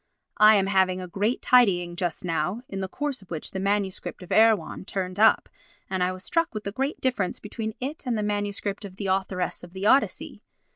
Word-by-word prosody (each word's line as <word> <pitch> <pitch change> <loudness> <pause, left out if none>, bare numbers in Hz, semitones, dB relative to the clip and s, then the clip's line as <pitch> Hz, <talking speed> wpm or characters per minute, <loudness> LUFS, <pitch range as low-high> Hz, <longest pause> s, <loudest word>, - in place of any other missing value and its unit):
I 215 +1 +8
am 195 -2 +3
having 190 -1 +2
a 180 - -6
great 205 +7 -1
tidying 180 -9 +4
just 175 -1 -2
now, 180 +7 -1
in 195 - -5
the 190 - -2
course 285 +5 -3
of 195 - -18
which 160 -3 -4
the 190 - -4
MS. 195 -1 0
of 180 - -8
Erewhon 220 -6 +3
turned 185 0 -4
up, 220 - +5 0.4
and 190 -1 -1
I 180 - +1
was 185 +1 -7
struck 330 -2 0
with 215 - -4
the 200 - -4
great 270 +7 -2
difference 245 -8 -1
between 220 +1 -5
it 280 +2 -5
and 235 -2 0
the 210 - -1
MS. 205 -1 -2 0.2
of 195 -2 -9
The 200 - -6
Authoress 190 -1 -1
of 175 0 -12
the 190 +1 -4
Odyssey. 270 +6 +2
200 Hz, 210 wpm, -26 LUFS, 185-220 Hz, 0.4 s, I